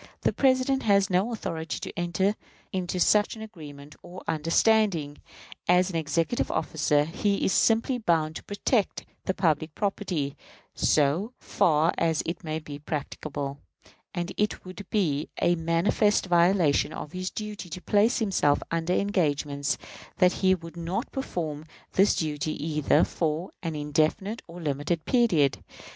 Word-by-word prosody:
The - - +1
President 265 0 +2
has 200 -2 +3
no 190 +6 +2
authority 165 -7 -4
to - - -6
enter 175 +3 +1 0.4
into 185 -1 -2
such 210 +5 +3
an 220 - -8
agreement 150 -8 -11
or 180 +1 -10
understanding. 165 -1 +2 0.5
As 180 +1 +4
an - - -7
executive 165 +7 0
officer, 150 -2 +1
he 200 +5 0
is - - +2
simply 230 +3 +3
bound 160 -7 +1
to - - -11
protect 205 +1 -1 0.2
the 190 - 0
public 155 -3 0
property, 185 -8 -2 0.4
so 155 - +2
far 155 0 +2
as 165 -2 +1
this 170 +1 -4
may 155 -1 -2
be 150 -2 -8
practicable; 145 -1 -4 0.6
and 175 0 -2
it 210 -2 -1
would 185 +1 -9
be 155 -8 0
a 175 - +3
manifest 170 +6 +2
violation 175 -4 +3
of 150 - -7
his 185 +1 -3
duty 210 -4 -6
to 180 - -6
place 210 +5 +2
himself 190 - +2
under 165 +1 0
engagements 150 -8 0 0.4
that 180 -1 +5
he 190 -1 +5
would 165 -1 -11
not 180 +9 -3
perform 160 - -4 0.3
this 195 +2 +4
duty 155 -1 -2
either 150 0 +2
for 160 +2 -2
an 165 -3 -3
indefinite 155 +9 0
or 170 +1 -10
limited 155 +1 -2
period. 180 - +3
170 Hz, 145 wpm, -27 LUFS, 155-200 Hz, 0.6 s, that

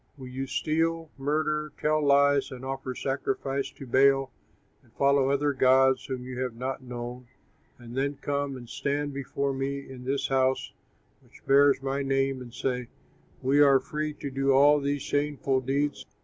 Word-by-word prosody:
Will 130 -2 -9
you 135 +1 -4
steal, 165 +2 -1
murder, 150 +1 -1
tell 155 0 +1
lies 140 0 +4
and 130 0 -8
offer 135 -1 -4
sacrifice 135 +1 -2
to 135 - -10
Baal, 135 +1 +3 0.5
and - - -27
follow 140 -1 +3
other 140 +1 +1
gods 130 0 +4
whom 130 -2 -4
you 125 -1 -6
have 125 -3 -3
not 130 +3 -4
known, 125 0 -7 0.5
and 120 -1 -11
then 140 +2 0
come 140 -1 -2
and 120 -1 -11
stand 140 +3 -2
before 140 0 -2
me 135 +1 -2
in 130 -1 -10
this 135 +2 -1
house 130 0 +1 0.5
which - - -20
bears 140 0 +4
my 135 +1 -1
name 135 -1 0
and 120 -1 -9
say, 125 0 -2 0.6
We 140 +3 +4
are 140 -2 +6
free 150 +3 -4
to 140 - -6
do 135 0 +1
all 145 +2 +6
these 140 0 -2
shameful 145 -2 0
deeds? 140 +3 -1
135 Hz, 165 wpm, -27 LUFS, 130-140 Hz, 0.6 s, are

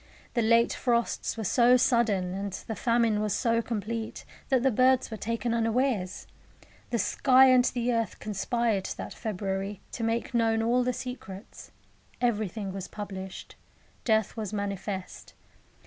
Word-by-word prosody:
The 235 - +1
late 230 +1 +4
frosts 235 -2 0
were 220 - -3
so 245 +5 +5
sudden, 235 -8 +2
and 195 0 -4
the 225 - -4
famine 230 -3 +2
was 210 -2 0
so 230 -2 +1
complete, 225 0 -4 0.2
that 260 -3 +3
the 265 - +4
birds 255 +2 +3
were - - -3
taken 230 +2 -2
unawares. 225 -4 0 0.6
The 235 - 0
sky 260 +2 +5
and 250 -1 +5
the 245 -1 0
earth 230 -2 -1
conspired 215 0 -1
that - - -6
February 195 -1 -3
to 230 - -5
make 230 +2 -1
known 225 -1 +2
all 245 +2 +2
the 250 - +1
secrets; 240 -6 -8 0.5
everything 215 -4 -1
was 190 -2 -5
published. 190 -2 -7 0.5
Death 220 -3 +1
was 215 -3 -4
manifest. 200 -2 -5
225 Hz, 145 wpm, -28 LUFS, 205-240 Hz, 0.6 s, so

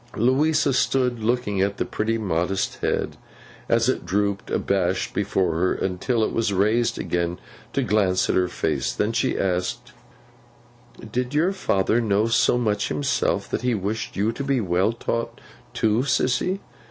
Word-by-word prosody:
Louisa 140 +5 +3
stood 125 -2 +1
looking 110 -4 0
at 100 +1 0
the - - -1
pretty 110 +1 -1
modest 95 -2 -1
head, - - -2 0.5
as 115 0 +3
it 130 - 0
drooped 100 0 -1
abashed 95 -1 0
before 95 -4 0
her, 90 +3 +1
until 95 +5 -1
it - - 0
was 115 -2 +1
raised 110 +5 +2
again 85 0 -1 0.3
to - - 0
glance 95 -3 +2
at - - +1
her 90 -1 +3
face. - - -1
Then 105 +2 0
she 125 +3 0
asked: 90 -1 -2 1.2
'Did 125 +4 -2
your 170 +5 +3
father 115 - +1
know 105 -1 +2
so 115 +1 +3
much 105 -4 0
himself, 75 -1 0
that - - -1
he 125 -1 +1
wished 105 +3 -3
you 105 +3 +1
to 140 - -5
be 140 -2 +1
well 95 0 +1
taught 115 0 -3 0.3
too, 110 0 +1
Sissy? 140 +7 0
110 Hz, 155 wpm, -23 LUFS, 95-120 Hz, 1.2 s, Louisa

